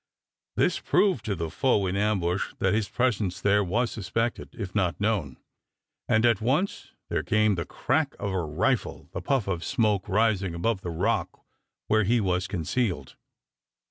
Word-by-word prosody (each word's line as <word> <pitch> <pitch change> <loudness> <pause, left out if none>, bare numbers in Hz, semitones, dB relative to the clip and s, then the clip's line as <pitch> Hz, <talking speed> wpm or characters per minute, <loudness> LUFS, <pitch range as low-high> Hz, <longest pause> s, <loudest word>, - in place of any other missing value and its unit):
This - - +2
proved 185 - +2
to 105 -4 -1
the 80 -2 -4
foe 105 -2 +2
in 90 0 -1
ambush 100 -3 0
that 95 0 +1
his 105 -2 0
presence 105 -7 0
there 105 0 +3
was 115 +6 0
suspected, 115 +3 -2
if 100 -6 -5
not 95 -5 0
known, 100 - -1 0.7
and 110 +2 +4
at 115 -4 +3
once 145 - -1 0.2
there - - 0
came 110 -1 +2
the 85 -3 -2
crack 155 -3 0
of 100 -1 -3
a 95 -1 0
rifle, 75 0 -1
the 85 - -5
puff 120 +3 0
of 90 -3 -2
smoke 105 -3 +1
rising 100 -4 +1
above 95 +3 0
the 90 - -5
rock 80 - -1 0.4
where 110 0 +3
he 115 +5 +2
was 90 -3 0
concealed. 95 +4 -2
100 Hz, 165 wpm, -27 LUFS, 90-115 Hz, 0.7 s, and